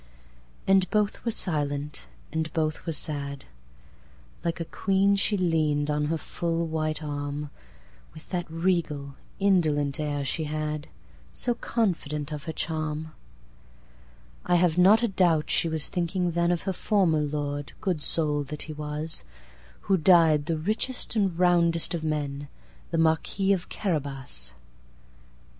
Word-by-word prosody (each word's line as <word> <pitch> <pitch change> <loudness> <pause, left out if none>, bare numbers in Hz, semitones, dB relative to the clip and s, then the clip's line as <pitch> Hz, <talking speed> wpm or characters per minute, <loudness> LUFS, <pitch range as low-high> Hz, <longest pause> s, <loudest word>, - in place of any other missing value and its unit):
And 190 -1 +4
both 210 -1 0
were - - +2
silent, 145 - 0 0.2
and 160 0 -2
both 155 +1 -1
were - - +1
sad. 145 -2 -1 1.0
Like 170 -1 -1
a 165 - -2
queen 195 +3 +2
she 200 +1 +2
lean'd 155 -4 +1
on 150 0 0
her 165 +2 0
full 170 +1 -2
white 155 -1 -2
arm, 145 0 -4 0.6
With 155 - -12
that 175 -2 -2
regal, 160 -5 -1 0.3
indolent 155 -8 +2
air 145 -2 -2
she 160 +3 -1
had; 155 0 -3 0.4
So 245 - +1
confident 160 - -1
of 150 -1 -5
her 160 - -3
charm!I - - -6
have 175 -2 +3
not 200 +6 +6
a - - +4
doubt 175 -6 +2
she 165 - +3
was 160 -2 +1
thinking 180 0 -1
thenOf 170 0 +1
her 190 - -1
former 180 -6 +2
lord, 145 -1 -3
good 180 -6 -1
soul 150 -1 +1
that 150 +2 -4
he 155 - -7
was! 150 - -2 0.6
Who 190 0 +2
died 160 -3 +5
the 165 - 0
richest 220 +10 -1
and 195 -6 +1
roundest 170 -2 +3
of 165 -2 -3
men, 145 -2 -2 0.4
The 165 - -1
Marquis 165 +5 +2
of 180 -2 -3
Carabas. 135 - -3
155 Hz, 135 wpm, -27 LUFS, 145-175 Hz, 1.0 s, not